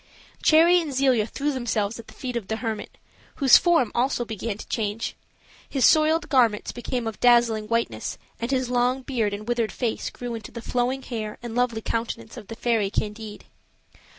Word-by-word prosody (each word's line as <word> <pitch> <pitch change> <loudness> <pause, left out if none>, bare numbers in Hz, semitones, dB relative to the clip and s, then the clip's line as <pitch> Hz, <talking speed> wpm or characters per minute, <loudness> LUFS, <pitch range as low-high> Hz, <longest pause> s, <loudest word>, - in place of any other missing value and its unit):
Cherry 340 +3 +6
and 310 -3 -5
Zelia 255 -5 +3
threw 285 +5 -2
themselves 230 -4 -2
at 230 - -11
the - - -14
feet 255 -3 -5
of 225 -5 -3
the 220 - -1
hermit, 220 -2 -5 0.4
whose 270 -3 +7
form 335 -10 +3
also 245 0 0
began 220 -1 -4
to - - -10
change. 215 0 -2 0.5
His 265 -4 +2
soiled 320 +2 +4
garments 235 -7 +2
became 240 0 -4
of 225 -1 -5
dazzling 235 -3 +4
whiteness, 230 - -2 0.2
and 235 - -3
his 255 -2 0
long 250 +2 +1
beard 230 -6 -1
and 205 +2 -6
withered 240 -2 0
face 235 -3 -2
grew 245 -1 -6
into 225 -2 -7
the 235 - -7
flowing 255 +2 -1
hair 215 -3 -5
and 235 -2 -5
lovely 240 -2 0
countenance 230 0 -4
of 225 -5 -10
the 225 - -7
fairy 225 -4 +1
Candide. 210 +1 -4
235 Hz, 180 wpm, -25 LUFS, 220-255 Hz, 0.5 s, whose